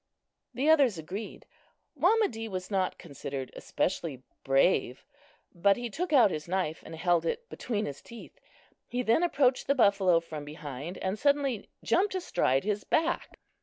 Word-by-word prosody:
The 265 +5 0
others 280 - +5
agreed. 185 +7 -7 0.5
Wamedee 250 - +2
was 185 0 -5
not 190 -2 0
considered 140 -4 -6
especially 155 -8 -2 0.2
brave; 135 0 +2 0.5
but 195 +3 +3
he 240 -1 -5
took 350 - -3
out 250 -9 +6
his 155 0 -5
knife 180 -3 -1
and 165 - -9
held 175 0 +2
it 470 - -3
between 215 -3 -3
his 140 -1 -6
teeth. 235 -1 -12 0.5
He 250 +1 -2
then 230 +7 +3
approached 275 -7 +2
the 280 - +3
buffalo 200 -7 +4
from 155 -3 -8
behind 150 +2 -7
and 190 +2 -3
suddenly 280 -6 +1
jumped 395 +1 +2
astride 135 - +1
his 210 0 -1
back. 335 +2 0
200 Hz, 150 wpm, -29 LUFS, 165-260 Hz, 0.5 s, out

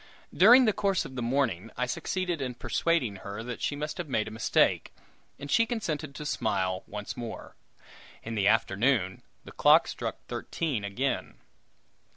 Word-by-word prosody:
During 245 +7 +8
the 215 - +3
course 200 -3 0
of - - -9
the 125 - -3
morning, 115 -5 0
I 125 - +1
succeeded 175 +6 -2
in 125 -2 -3
persuading 125 - 0
her 100 +3 -7
that 120 0 -6
she 145 - -1
must 150 +4 -5
have 170 -4 -4
made 110 -5 0
a - - -6
mistake, 110 +1 +2 0.5
and 140 0 -7
she 230 0 +4
consented 155 - -3
to 150 - -7
smile 95 -9 -1
once 105 0 -6
more. 115 -2 -7 0.7
In 115 - -5
the 100 -3 +1
afternoon 105 -2 +2 0.2
the - - -11
clock - - +5
struck - - -4
thirteen 145 -11 -3
again. 120 +7 -2
125 Hz, 165 wpm, -28 LUFS, 110-160 Hz, 0.7 s, During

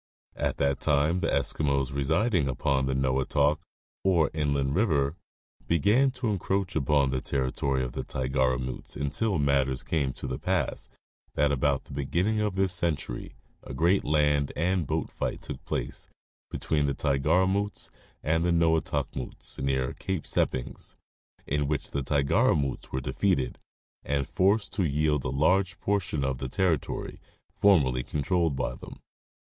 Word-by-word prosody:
At - - -1
that 70 -1 +1
time 75 +4 +2
the - - 0
Eskimos 70 -3 0
residing 80 - +1
upon 65 +1 0
the 65 - 0
Noatok, 65 +3 +2 0.4
or 90 -5 +3
Inland 70 -3 0
river, 80 -7 +2 0.5
began 105 - +4
to 125 -4 -1
encroach 95 -1 -1
upon 70 -2 +2
the 65 -1 -1
territory 65 0 -1
of 60 - -3
the - - -4
Tigaramutes 65 -1 -1
until 95 +8 -1
matters 70 -2 +1
came 70 -5 0
to - - -8
the 65 +1 -3
pass 90 -3 -1 0.5
that 75 -1 +3
about 70 0 +1
the - - -12
beginning 90 +10 0
of 105 -3 0
this 95 -1 +1
century 80 -8 -3 0.3
a - - -8
great 85 +7 +3
land 75 -2 +2
and 85 -1 0
boat - - -2
fight - - -3
took - - -7
place - - -4 0.4
between 75 -2 0
the 70 - -1
Tigaramutes 95 +9 +1 0.3
and 80 +2 +1
the 90 - +1
Noatokmutes 80 -6 -1
near 65 -2 0
Cape 95 -4 -3
Seppings, 65 0 -2 0.5
in 75 0 0
which 75 -1 -2
the 70 - -1
Tigaramutes 70 0 +1
were 65 - -2
defeated 65 0 0 0.4
and 70 -1 -1
forced 100 +3 +2
to 95 - 0
yield 75 -2 +1
a - - 0
large 90 +8 +2
portion 95 -8 0
of 65 -1 -1
the 65 -1 -4
territory 90 -3 -1 0.3
formerly 70 -11 +3
controlled 80 +3 0
by 65 - -2
them. - - -11
75 Hz, 145 wpm, -28 LUFS, 65-90 Hz, 0.5 s, began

